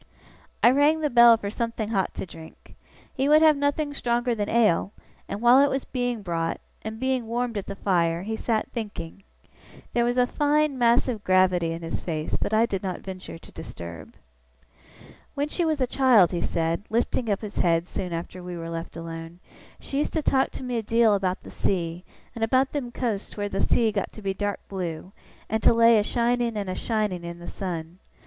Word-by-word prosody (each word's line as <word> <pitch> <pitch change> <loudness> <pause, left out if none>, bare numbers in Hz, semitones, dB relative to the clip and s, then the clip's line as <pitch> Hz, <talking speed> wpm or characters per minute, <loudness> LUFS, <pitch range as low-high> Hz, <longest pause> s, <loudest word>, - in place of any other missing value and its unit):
I 240 - +8
rang 295 +4 +3
the 300 - 0
bell 235 -1 +8
for 200 -2 -5
something 230 -1 -3
hot 195 -4 -1
to - - -4
drink. 160 -2 -14 0.4
He 270 +2 0
would 305 +1 +6
have 310 -1 +6
nothing 285 +1 -1
stronger 240 -2 0
than 210 -2 -2
ale; 215 -4 +2 0.4
and 205 - -4
while 240 +2 +7
it 285 - +3
was 270 0 -2
being 245 -4 -2
brought, 165 -2 -2 0.2
and 220 0 -6
being 260 -2 -1
warmed 235 0 -2
at 200 - -4
the 200 - -5
fire, 170 -3 +1
he 220 +2 -3
sat 220 -1 -1
thinking. 205 -6 -6 0.7
There 240 - +2
was 240 +1 0
a 250 - +5
fine, 295 +2 +1
massive 235 -2 +2
gravity 185 -2 +3
in 165 +1 -5
his 165 - -4
face, 155 -3 -3 0.2
I 220 +1 +4
did 195 -5 -3
not 185 -2 -4
venture 185 -3 -8
to - - -16
disturb. 85 -2 -9 1.2
'When 285 +1 -1
she 345 +2 0
was 310 -2 0
a 255 - +3
child,' 245 -8 +4
he 175 - -2
said, 165 +1 -1
lifting 230 +1 0
up 200 - 0
his 210 -2 -6
head 170 0 +2
soon 185 -1 -4
after 170 +2 -5
we 180 -1 -6
were 165 0 -6
left 165 0 -6
alone, 165 0 -7 0.4
'she 275 - -3
used 295 - -1
to 315 - -1
talk 265 -1 +2
to - - -7
me 250 -1 -2
a - - -2
deal 225 0 +3
about 190 -2 -1
the - - -11
sea, 170 -2 -2 0.3
and 230 -1 -4
about 260 +4 +2
them 265 -5 -3
coasts 225 -6 -3
where 205 0 -2
the 195 0 -2
sea 230 -2 +2
got 200 -2 -2
to 215 - -11
be 195 -1 -1
dark 205 +1 -3
blue, 180 -2 -5 0.4
and 220 +1 -1
to - - +5
lay 230 -1 +6
a - - +1
shining 235 0 0
and 200 -2 -3
a - - -3
shining 210 -6 -1
in 170 0 -6
the 175 - -10
sun. 175 -2 -5
215 Hz, 205 wpm, -25 LUFS, 180-245 Hz, 1.2 s, I